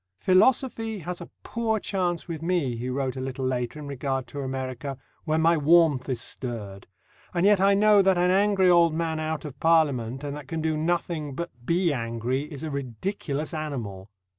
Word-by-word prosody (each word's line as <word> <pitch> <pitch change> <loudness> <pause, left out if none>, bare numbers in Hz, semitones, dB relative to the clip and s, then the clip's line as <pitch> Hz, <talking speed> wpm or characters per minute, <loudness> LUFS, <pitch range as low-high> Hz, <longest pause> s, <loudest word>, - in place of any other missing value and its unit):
"Philosophy 225 +3 +2
has 180 0 -6
a 170 - -9
poor 225 -2 -1
chance 180 -4 -2
with 165 -3 -5
me," 165 -8 0
he 120 +2 -4
wrote 130 0 -2
a 130 - -4
little 130 0 -4
later 125 +1 -2
in 150 - -7
regard 135 -1 -2
to 145 - -6
America, 130 0 -4 0.3
"when 155 +1 +1
my 165 +1 +5
warmth 155 -3 +4
is 125 -3 -1
stirred 110 -5 -6 0.5
and 175 +2 +2
yet 205 -2 +5
I 200 +1 +5
know 210 0 +6
that 190 -1 +3
an 180 +1 +3
angry 195 -1 +3
old 170 -2 +5
man 160 -1 -1
out 155 0 -3
of 140 -3 -8
Parliament, 140 -6 +2
and 145 0 -4
that 145 -3 -9
can 165 +3 -3
do 160 0 0
nothing 160 -2 -1
but 170 +3 -4 0.2
be 170 -1 +2
angry, 120 +4 -2
is 145 0 -7
a 155 - -3
ridiculous 140 - -4
animal." 115 -11 -5
155 Hz, 190 wpm, -26 LUFS, 130-175 Hz, 0.5 s, know